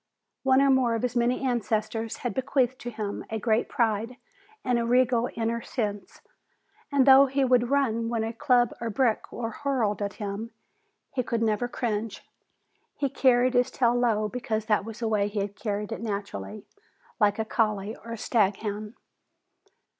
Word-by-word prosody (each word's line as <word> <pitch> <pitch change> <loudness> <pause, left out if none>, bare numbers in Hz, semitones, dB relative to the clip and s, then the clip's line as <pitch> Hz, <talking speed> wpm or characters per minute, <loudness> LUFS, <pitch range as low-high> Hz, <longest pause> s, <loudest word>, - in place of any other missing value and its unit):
One 265 0 +4
or 275 - +4
more 250 -3 +3
of 225 - -3
his 250 -1 -1
many 245 +2 +1
ancestors 225 -2 -1
had 245 - 0
bequeathed 260 -1 0
to 240 - -5
him 215 -3 -4
a 220 - -2
great 220 +1 +1
pride 230 +1 0 0.5
and 245 -2 +2
a - - 0
regal 245 0 +2
inner 230 +1 -1
sense, 205 -5 -4 0.7
and 275 -2 +4
though 275 0 +8
he 270 +1 +1
would 245 -1 +3
run 230 -5 +1
when 230 -2 -1
a 225 +1 -3
club 245 -2 +2
or 230 - -2
brick 225 +1 0
was 230 -2 -4
hurled 245 -8 0
at 200 0 -2
him, 205 +1 -5 0.6
he 255 - 0
could 235 -1 -1
never 220 +2 +1
cringe. 225 -3 -3 0.7
He 280 - -1
carried 255 -1 +3
his 245 +1 +3
tail 240 -2 +2
low 230 -3 +1
because 220 -1 -3
that 210 -3 +1
was 225 +1 -8
the 230 - 0
way 210 -2 +1
he 205 -1 -2
carried 205 +1 -4
it 225 - -4
naturally, 210 -1 -5 0.5
like 205 -2 +3
a 220 - -1
collie 215 -1 0
or 230 - -9
staghound. 210 0 -1
230 Hz, 170 wpm, -27 LUFS, 215-250 Hz, 0.7 s, though